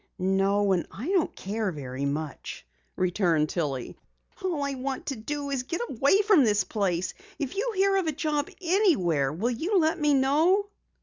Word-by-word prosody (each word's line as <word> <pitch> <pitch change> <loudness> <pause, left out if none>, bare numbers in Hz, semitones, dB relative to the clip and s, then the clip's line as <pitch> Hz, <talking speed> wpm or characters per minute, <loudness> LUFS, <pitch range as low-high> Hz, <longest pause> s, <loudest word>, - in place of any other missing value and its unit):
"No, 195 +2 +2
and 180 -3 +1
I 245 - -6
don't 375 -4 +1
care 210 0 -2
very 135 -3 -5
much," 145 0 -4 0.3
returned 175 -4 +1
Tillie. 140 -7 -3 0.5
"All 340 -6 -1
I 280 0 -1
want 265 0 -4
to 275 - -3
do 280 +5 -4
is 270 -2 0
get 305 +7 -4
away 280 - +3
from 405 -8 +5
this 205 -3 +3
place. 185 -3 -1 0.2
If 285 0 -4
you 460 +5 -1
hear 390 +1 +3
of 375 -4 0
a - - +2
job 300 -1 -1
anywhere 265 - +2
will 210 +11 -1
you 340 - 0
let 320 -2 +2
me 295 -1 +4
know?" 320 +10 +3
255 Hz, 175 wpm, -27 LUFS, -, 0.5 s, from